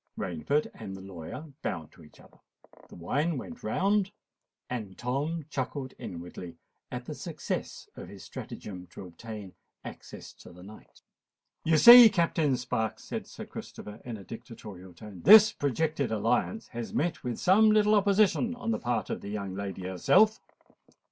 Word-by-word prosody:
Rainford 140 - -1
and 95 0 -8
the - - -10
lawyer 95 - -9
bowed 80 -5 -4
to 85 - -17
each 75 - -19
other; - - -20 0.5
the - - -13
wine 145 - -1
went 245 - -8
round; 200 0 +1 0.6
and 110 -7 -6
Tom 145 +6 -2
chuckled 130 -1 -4
inwardly 85 0 -8 0.3
at - - -6
the - - -6
success - - -5
of - - -9
his - - -11
stratagem 90 -3 -8
to 95 - -10
obtain 100 +2 -9 0.3
access - - -10
to - - -15
the 90 +1 -14
knight. 105 +3 -15 0.6
"You 160 -1 +3
see, 235 +7 +11
Captain 165 -7 +1
Sparks," 110 -3 -3
said - - -6
Sir - - -9
Christopher 105 0 -10
in 120 -3 -6
a 100 - -11
dictatorial 100 -5 -11
tone, 100 -1 -11
"this 215 - +9
projected 145 0 -1
alliance 115 - -1
has 120 -1 -6
met 155 -4 -1
with 125 -2 -3
some 215 +4 +5
little 215 0 +4
opposition 210 +4 +3
on 240 -2 -3
the - - -1
part 120 -1 -2
of - - -4
the 100 - -7
young 100 -2 -4
lady 95 -1 -5
herself." 95 - +3
125 Hz, 160 wpm, -29 LUFS, -, 0.6 s, see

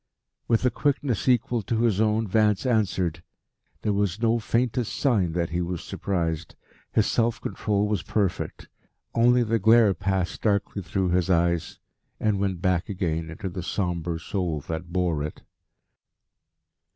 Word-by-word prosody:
With 115 +1 +2
a 125 - +4
quickness 135 -6 0
equal 120 -1 +2
to 110 +2 -1
his 110 -3 +2
own, 110 0 +2
Vance 105 +2 +2
answered. 95 -8 0 0.6
There 105 - +1
was 100 -1 0
no 115 0 +2
faintest 120 +1 0
sign 105 - +1
that 85 -1 -1
he 85 +1 0
was 90 -1 -3
surprised. 85 -4 -3 0.4
His 110 - +3
self 115 0 +1
control 105 -1 -1
was 105 -4 0
perfect. 100 0 -2 0.5
Only 120 +1 +4
the 115 0 +1
glare 110 0 +5
passed 95 -2 -2
darkly 100 -1 0
through 95 +1 -1
his 90 +1 +1
eyes 85 -2 +1 0.4
and 105 -2 +1
went 95 -3 -2
back 90 0 +1
again 85 -5 -2
into 90 +5 -6
the 90 0 -5
sombre 85 -2 -2
soul 85 -3 -2
that 80 +3 -6
bore 90 -4 0
it. 75 +1 -6
95 Hz, 150 wpm, -25 LUFS, 85-110 Hz, 0.6 s, glare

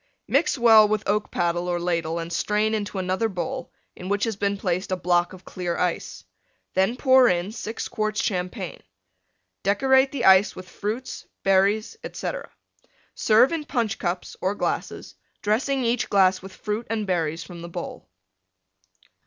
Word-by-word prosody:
Mix - - +2
well 225 -3 +7
with 215 0 0
oak 210 +1 0
paddle 175 0 -1
or 175 -1 0
ladle 170 -2 -1
and 170 0 -5
strain 210 +4 +1
into 205 -2 -3
another 190 +4 0
bowl 255 +8 -4 0.2
in 180 - -7
which 205 0 0
has 225 -2 0
been 200 0 -1
placed 185 0 -2
a - - +2
block 175 -1 +1
of 185 0 -13
clear 175 -2 -3
ice. 180 -2 -2 0.5
Then 195 +6 +1
pour 260 -2 +6
in 180 +1 0
6 220 0 -5
quarts 215 -1 -2
Champagne. 180 0 -3 0.8
Decorate 265 +6 +3
the 260 -4 -2
Ice 190 +1 +6
with 185 0 -9
Fruits, 220 +8 -5 0.2
Berries, 200 - +2
etc. - - -5 0.6
Serve 225 +4 +4
in 325 -2 -2
Punch 235 -7 -1
cups 180 0 -3
or 190 +2 0
glasses, - - -3 0.3
dressing 260 +6 +1
each 235 +1 0
glass 190 -2 +4
with 190 0 -10
Fruit 215 +2 -4
and 220 -2 -1
Berries 165 -3 -1
from 170 +1 -10
the 170 - -7
bowl. 175 - -7
200 Hz, 160 wpm, -24 LUFS, 180-225 Hz, 0.8 s, well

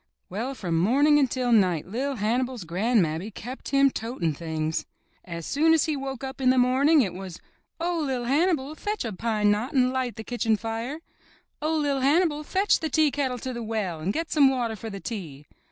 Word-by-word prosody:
Well, 240 +8 -3
from 170 -8 -1
morning 285 - +4
until 255 -2 +1
night 185 -8 +3
LiT 260 +7 -3
Hannibal's 240 +2 -1
gran'mammy 180 -1 0
kept 245 +5 -8
him 275 -1 +4
toting 225 -10 -2
things. 160 0 -3 0.4
As 170 -2 -6
soon 320 +3 +3
as 315 - +2
he 310 - -1
woke 270 -1 -5
up 265 0 -6
in 255 - +4
the 260 - +4
morning 265 +4 +4
it 190 -5 -3
was: 185 -2 -8 0.4
'*0h, 335 -3 -1
LiT 250 -3 -2
Hannibal, 300 0 +1
fetch 415 - -3
a 225 - -3
pine 210 +1 +1
knot 225 +8 -1
and 255 -2 +3
light 255 -2 -2
the 220 - -7
kitchen 225 -2 0
fire.'* 230 +8 -4 0.6
''Oh, 315 +1 0
LiT 285 -2 0
Hannibal, 300 +2 +2
fetch 390 +6 +2
the 320 - -2
tea 310 0 +3
kettle 265 -3 -1
to 255 +2 -5
the 235 - -5
well 215 -7 -3
and 170 +5 -1
get 325 +5 -3
some 285 -3 +5
water 240 -4 -1
for 225 +1 -7
the 200 -2 -6
tea.' 165 - -7
250 Hz, 200 wpm, -26 LUFS, 205-280 Hz, 0.6 s, some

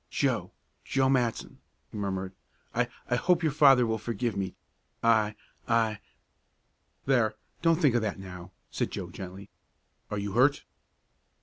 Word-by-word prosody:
"Joe - - 0 0.3
Joe 135 -1 +1
Matson!" 125 -4 0 0.3
he - - -11
murmured. 95 -2 -3 0.4
"I - - +1 0.2
I 120 - +1
hope 175 +4 +2
your 155 - +2
father 135 -4 +6
will 110 -1 -1
forgive 115 +1 -2
me. 95 -1 -3 0.5
I 110 -2 +3 0.3
I 115 -2 +2 0.5
" - - -44
"There, 120 -5 +2 0.3
don't 165 0 +3
think 145 -8 +4
of 120 - +2
that 105 -2 -2
now," 90 -2 -9 0.2
said - - -1
Joe - - -6
gently. 95 +1 -9 0.6
"Are 105 - -3
you 100 0 -3
hurt?" 130 +7 +3
115 Hz, 145 wpm, -29 LUFS, 100-130 Hz, 0.6 s, father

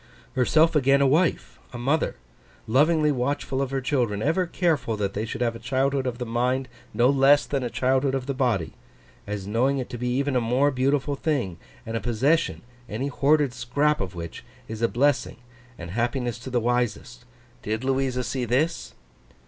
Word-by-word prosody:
Herself 155 +5 +3
again 140 -1 +4
a 140 - +4
wife—a 150 -3 0
mother—lovingly 140 - 0
watchful 135 0 -1
of 135 - -1
her 135 0 -2
children, 120 -7 0
ever 180 +6 +1
careful 160 -11 0
that 100 -1 -2
they 105 +2 -2
should 115 - -6
have 115 -1 0
a - - -8
childhood 135 +2 0
of 120 -1 -3
the 125 - -4
mind 125 +3 0 0.2
no 120 - +3
less 140 +1 +5
than 140 -2 -2
a 125 - -2
childhood 130 +2 +1
of 130 -2 -3
the 140 - -2
body, 120 -10 0 0.5
as 100 -2 -4
knowing 125 +7 +1
it 130 - -4
to 120 - -6
be 125 0 -1
even 135 +2 0
a 125 - +3
more 125 +5 +2
beautiful 135 +2 0
thing, 130 - -2 0.3
and 115 - -4
a - - 0
possession, 130 +7 +1 0.3
any 130 +7 -2
hoarded 145 -1 +2
scrap 140 +5 0
of 95 -1 -5
which, 85 -1 -7 0.2
is 110 0 -6
a 115 - +4
blessing 140 +2 +1 0.4
and 85 0 -8
happiness 120 +2 -1
to 130 - -8
the 125 -1 +1
wisest? 120 +1 -2 0.4
Did 110 +3 -3
Louisa 130 -1 0
see 125 0 -2
this? 135 +8 -1
130 Hz, 180 wpm, -25 LUFS, 120-140 Hz, 0.5 s, less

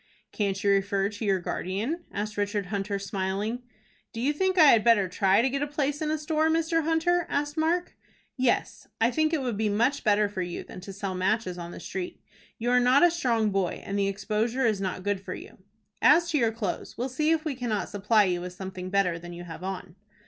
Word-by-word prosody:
"Can't 195 -2 -1
you 200 - +4
refer 195 0 +1
to 210 +1 -6
your 195 -2 +2
guardian?" 215 - -3
asked 210 +1 -4
Richard 205 0 -1
Hunter, 200 0 -1
smiling. 200 +3 -2 0.5
"Do 230 - -6
you 275 +5 +1
think 375 +4 0
I 310 -4 +8
had 220 -3 +4
better 210 -5 +4
try 195 +4 +3
to 265 - +2
get 275 +1 -1
a 290 - 0
place 290 0 -2
in 310 - -1
a 310 - +1
store, 310 +1 +1
Mr. 330 0 +2
Hunter?" 330 +2 +1
asked 290 +1 -1
Mark. 335 +3 0 0.4
"Yes, 255 -2 0
I 230 +2 +3
think 310 +3 +1
it 310 -5 0
would 240 -5 -2
be 215 0 +1
much 235 +8 +1
better 210 -2 +3
for 200 -2 -4
you 175 -1 -4
than 185 - -10
to 195 - -8
sell 195 -1 -4
matches 185 0 -1
on 170 0 -6
the - - -9
street. 185 -2 -5 0.4
You 240 +2 -1
are 250 - +5
not 250 +4 +5
a 350 - +6
strong 235 -10 +1
boy, 195 -3 -1
and 200 - -4
the 200 - +2
exposure 215 +6 -1
is 215 -4 +1
not 185 -1 -3
good 205 -1 -1
for - - -6
you. - - -12 0.4
As 340 +3 +5
to 300 - +2
your 230 -3 +2
clothes, 220 -5 -4
we'll 245 - -1
see 300 +4 0
if 325 0 +1
we 305 - -1
cannot 240 -5 -2
supply 210 +2 +3
you 180 -2 0
with 180 0 -6
something 185 -1 -6
better 185 -3 +1
than 175 +1 -9
you 175 0 -8
have 170 0 -9
on." 185 -2 -5
215 Hz, 230 wpm, -27 LUFS, 195-285 Hz, 0.5 s, I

